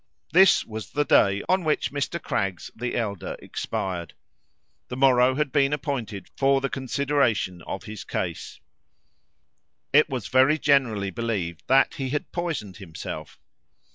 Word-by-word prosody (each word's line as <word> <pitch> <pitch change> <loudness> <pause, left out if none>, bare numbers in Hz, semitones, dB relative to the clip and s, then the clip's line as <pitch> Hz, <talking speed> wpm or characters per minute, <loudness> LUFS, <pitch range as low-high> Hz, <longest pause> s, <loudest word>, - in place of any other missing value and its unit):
This 190 +2 +6
was 110 -1 -7
the 145 0 +1
day 100 -5 +4
on 185 0 +2
which 155 -1 0
Mr. 145 +4 -2
Craggs 95 - -3
the 125 0 -3
elder 105 -5 -3
expired. 85 -4 -4 0.7
The 125 - -6
morrow 130 -1 +4
had 150 -1 -1
been 140 -1 +2
appointed 125 -9 -4
for 135 0 +3
the 135 0 -3
consideration 130 -9 0
of - - -5
his 110 -3 -8
case. - - -4 1.3
It 150 +2 +6
was 125 -6 -4
very 130 +4 +4
generally 125 -10 +2
believed 95 -7 -3
that 135 +1 +4
he 135 -2 -4
had 145 +2 -3
poisoned 160 - -4
himself. 80 -4 -8
130 Hz, 140 wpm, -25 LUFS, 100-140 Hz, 1.3 s, This